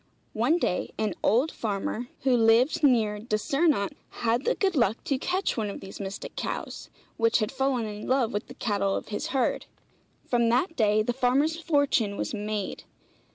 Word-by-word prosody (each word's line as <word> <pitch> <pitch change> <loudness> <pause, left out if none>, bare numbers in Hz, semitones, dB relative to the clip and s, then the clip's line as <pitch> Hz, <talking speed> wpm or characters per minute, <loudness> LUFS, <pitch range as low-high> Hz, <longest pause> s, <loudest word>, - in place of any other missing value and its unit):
One 245 +10 +2
day 180 - -1
an 215 -3 0
old 250 +10 +3
farmer, 215 +2 -3
who 260 -2 +3
lived 230 +6 +4
near 220 -6 +3
Dyssyrnant, 225 - +1 0.3
had 235 +4 +1
the - - +2
good 385 -3 0
luck 235 -5 +2
to 275 -2 -1
catch 370 +6 -1
one 215 -3 -2
of 200 - -6
these 195 0 -10
mystic 195 -1 -6
cows, - - -5 0.3
which 230 0 +3
had 215 +1 -1
fallen 265 -3 0
in 210 0 -6
love 255 -3 +1
with 205 - -3
the - - -11
cattle 200 -3 0
of - - -5
his 210 - -3
herd. 265 -2 0 0.6
From 235 -2 +2
that 290 +8 +1
day 215 -3 +3
the 245 - -1
farmer's 265 +5 +2
fortune 285 -10 +1
was - - -3
made. 210 -1 -3
235 Hz, 175 wpm, -27 LUFS, 210-270 Hz, 0.6 s, lived